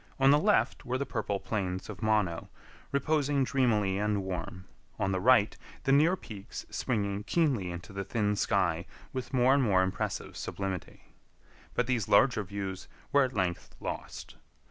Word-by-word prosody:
On 135 Hz, +1 st, +6 dB
the 145 Hz, -, +6 dB
left 210 Hz, +6 st, +2 dB
were 125 Hz, +1 st, -1 dB
the 140 Hz, -, -2 dB
purple 100 Hz, -6 st, -2 dB
plains 95 Hz, -4 st, -3 dB
of 105 Hz, -1 st, -8 dB
Mono, 105 Hz, -6 st, +1 dB, 0.4 s
reposing 140 Hz, 0 st, +1 dB
dreamily 110 Hz, -8 st, +1 dB
and 105 Hz, -1 st, 0 dB
warm; 90 Hz, 0 st, -5 dB, 0.3 s
on 95 Hz, -, 0 dB
the 95 Hz, -, 0 dB
right, 110 Hz, 0 st, +4 dB, 0.3 s
the 135 Hz, -, +2 dB
near 155 Hz, +6 st, +5 dB
peaks 105 Hz, -, -9 dB
springing 100 Hz, -4 st, -1 dB
keenly 130 Hz, -, +1 dB
into 85 Hz, +2 st, -7 dB
the 100 Hz, 0 st, -3 dB
thin 105 Hz, 0 st, 0 dB
sky 85 Hz, -4 st, +1 dB, 0.3 s
with 130 Hz, -1 st, -4 dB
more 130 Hz, 0 st, +4 dB
and 140 Hz, -, +4 dB
more 95 Hz, -7 st, +4 dB
impressive 95 Hz, -, -3 dB
sublimity. 95 Hz, -2 st, -5 dB, 0.6 s
But 125 Hz, -, +2 dB
these 115 Hz, -4 st, -1 dB
larger 110 Hz, +2 st, +5 dB
views 95 Hz, -1 st, -5 dB, 0.2 s
were 140 Hz, 0 st, +5 dB
at 130 Hz, -, -5 dB
length 90 Hz, -5 st, -2 dB
lost. -, -, -6 dB
105 Hz, 160 wpm, -30 LUFS, 95-130 Hz, 0.6 s, On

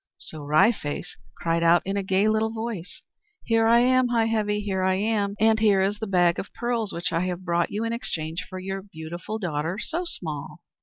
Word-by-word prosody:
So 155 Hz, -, -9 dB
Wry 155 Hz, +10 st, +5 dB
Face 165 Hz, -4 st, -5 dB, 0.2 s
cried 165 Hz, 0 st, 0 dB
out 170 Hz, +1 st, +5 dB
in 195 Hz, +1 st, -2 dB
a 200 Hz, -, 0 dB
gay 190 Hz, +2 st, +2 dB
little 220 Hz, 0 st, +2 dB
voice, 220 Hz, -5 st, -6 dB, 0.4 s
"Here 225 Hz, -1 st, +2 dB
I 235 Hz, +1 st, +6 dB
am, 255 Hz, 0 st, +4 dB
Heigh 235 Hz, -2 st, +2 dB
Heavy, 210 Hz, -2 st, 0 dB
here 195 Hz, -2 st, -2 dB
I 185 Hz, 0 st, +2 dB
am! 205 Hz, 0 st, 0 dB
And 220 Hz, +1 st, +4 dB
here 205 Hz, -3 st, +4 dB
is 205 Hz, +2 st, -1 dB
a 220 Hz, -, -2 dB
bag 175 Hz, -3 st, +3 dB
of 190 Hz, -, -6 dB
pearls 235 Hz, -3 st, -1 dB
which 170 Hz, 0 st, -2 dB
I 170 Hz, +2 st, +1 dB
have 180 Hz, 0 st, -4 dB
brought 170 Hz, -1 st, +1 dB
you 210 Hz, +2 st, -2 dB
in 230 Hz, 0 st, -1 dB
exchange 165 Hz, -7 st, -3 dB
for 185 Hz, -, -6 dB
your 195 Hz, +1 st, -4 dB
beautiful 175 Hz, +2 st, -7 dB
daughter 165 Hz, -2 st, -2 dB
So 340 Hz, +10 st, -3 dB
Small!" 155 Hz, -, -5 dB
195 Hz, 210 wpm, -25 LUFS, 175-220 Hz, 0.4 s, I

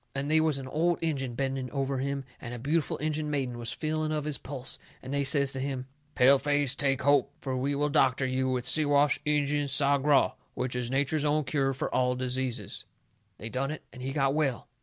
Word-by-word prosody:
And 140 Hz, +2 st, -2 dB
they 160 Hz, 0 st, +5 dB
was 155 Hz, -3 st, +2 dB
an 135 Hz, -1 st, -6 dB
old 165 Hz, +5 st, +1 dB
Injun 135 Hz, -7 st, -1 dB
bending 135 Hz, -1 st, -2 dB
over 135 Hz, -1 st, -1 dB
him 140 Hz, 0 st, -2 dB, 0.2 s
and 120 Hz, 0 st, -6 dB
a -, -, -6 dB
beautiful 145 Hz, +6 st, 0 dB
Injun 155 Hz, 0 st, -2 dB
maiden 130 Hz, -5 st, -2 dB
was 120 Hz, 0 st, -2 dB
feeling 155 Hz, +3 st, -1 dB
of 150 Hz, -1 st, -1 dB
his 150 Hz, -3 st, 0 dB
pulse, 130 Hz, -2 st, -5 dB, 0.2 s
and 130 Hz, +2 st, -7 dB
they 140 Hz, 0 st, +1 dB
says 140 Hz, 0 st, +2 dB
to 135 Hz, -, -2 dB
him: 130 Hz, -1 st, -3 dB, 0.3 s
"Pale 135 Hz, +2 st, +6 dB
face, 145 Hz, -2 st, +2 dB
take 135 Hz, -1 st, 0 dB
hope, 140 Hz, -1 st, +3 dB
fur 130 Hz, -2 st, -3 dB
we 135 Hz, +3 st, 0 dB
will 145 Hz, +1 st, +1 dB
doctor 135 Hz, -3 st, +3 dB
you 130 Hz, 0 st, 0 dB
with 125 Hz, -1 st, -1 dB
Siwash 145 Hz, +1 st, +3 dB
Injun 145 Hz, -1 st, +1 dB
Sagraw, 140 Hz, +1 st, +3 dB, 0.2 s
which 125 Hz, -1 st, -2 dB
is 125 Hz, -1 st, -2 dB
nature's 140 Hz, +3 st, 0 dB
own 150 Hz, +1 st, +2 dB
cure 135 Hz, -1 st, 0 dB
fur -, -, -2 dB
all 125 Hz, 0 st, +1 dB
diseases." 125 Hz, -4 st, -3 dB, 0.5 s
They 110 Hz, -, -7 dB
done 135 Hz, +3 st, -1 dB
it. 155 Hz, -, -6 dB
And 125 Hz, -, -10 dB
he 130 Hz, +1 st, -3 dB
got 135 Hz, -1 st, +1 dB
well. 140 Hz, -5 st, 0 dB
140 Hz, 210 wpm, -29 LUFS, 130-145 Hz, 0.5 s, Pale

